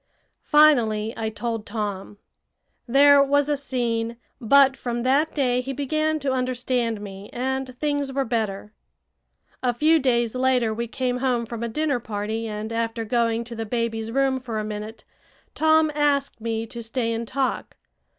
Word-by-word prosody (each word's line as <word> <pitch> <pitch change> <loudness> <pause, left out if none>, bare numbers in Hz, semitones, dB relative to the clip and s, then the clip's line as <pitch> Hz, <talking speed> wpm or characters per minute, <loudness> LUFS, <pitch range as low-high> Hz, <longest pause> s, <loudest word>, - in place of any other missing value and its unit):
Finally 235 -8 +4
I 220 -1 -2
told 225 0 -4
Tom. 205 -2 -4 0.7
There 280 +3 +6
was 285 +1 +2
a 295 - +2
scene; 235 -4 -2 0.2
but 270 +2 +5
from 240 -2 -3
that 280 +5 +2
day 250 -4 +1
he 270 +2 -5
began 310 +3 0
to 275 -1 0
understand 250 -3 -1
me, 200 -1 -9
and 260 0 -3
things 285 -1 -1
were 270 0 -1
better. 215 -3 -3 0.9
A 250 -1 +1
few 315 +5 +4
days 240 -4 +1
later 255 -3 +1
we 235 +2 -3
came 250 +1 -2
home 250 -2 0
from 230 0 -7
a 235 - -2
dinner 290 +1 0
party, 220 0 -4
and, 215 +1 -5
after 230 0 -2
going 230 0 +1
to 235 0 -9
the 225 - -3
baby's 225 0 -2
room 270 +1 +1
for 240 -4 -5
a 215 - -1
minute, 215 +1 -6 0.5
Tom 315 0 +3
asked 285 -4 0
me 225 0 -2
to 235 +1 -8
stay 230 0 -2
and 230 0 -4
talk. 265 +1 -2
240 Hz, 160 wpm, -24 LUFS, 225-270 Hz, 0.9 s, There